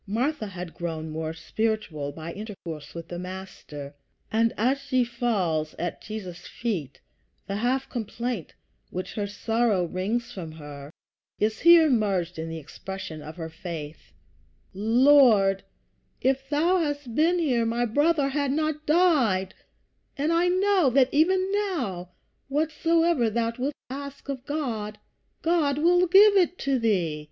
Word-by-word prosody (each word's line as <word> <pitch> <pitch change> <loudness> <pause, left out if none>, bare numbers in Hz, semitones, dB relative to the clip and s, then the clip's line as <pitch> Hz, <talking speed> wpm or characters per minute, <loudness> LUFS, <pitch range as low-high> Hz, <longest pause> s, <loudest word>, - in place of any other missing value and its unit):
Martha 235 +3 -1
had 180 -3 -7
grown 160 -2 -4
more 160 0 -3
spiritual 165 -4 -2
by 160 +3 -7
intercourse 170 -9 -8
with 170 -1 -7
the 175 - -5
Master, 180 -6 -8 0.4
and 230 +1 +3
as 255 +6 +2
she 260 -2 +1
falls 200 -10 -1
at 175 - -4
Jesus' 195 -5 -7
feet 170 - -4 0.5
the 195 - -3
half 255 +4 0
complaint 235 - -4 0.3
which 185 +1 -5
her 205 -2 -2
sorrow 220 -2 +1
wrings 200 +8 -2
from 165 -5 -7
her 145 -2 -9 0.5
is 215 +1 0
here 340 -1 +7
merged 195 - 0
in 165 0 -4
the 165 - -5
expression 160 +1 -7
of 155 +2 -9
her 165 -2 -5
faith: 160 - -8 0.6
"Lord, 225 -2 +5 0.6
if 270 +1 0
thou 335 +5 +3
hadst 290 -6 -3
been 330 +7 +3
here 260 -9 +1
my 235 +1 0
brother 290 +4 +2
had 280 -1 0
not 310 +1 -1
died; 290 - +3 0.6
but 295 +4 +1
I 340 +1 +3
know 370 -3 +3
that 260 0 +4
even 370 +5 +3
now, 275 - -2 0.4
whatsoever 320 -1 +2
thou 230 +1 -1
wilt 275 +3 -1 0.2
ask 280 +1 -7
of 265 -2 -5
God, 225 -9 -3 0.5
God 320 -4 +2
will 355 +3 +4
give 400 +3 +7
it 365 -1 +3
to 270 -2 0
thee. 180 -9 +1
230 Hz, 140 wpm, -26 LUFS, 180-290 Hz, 0.6 s, here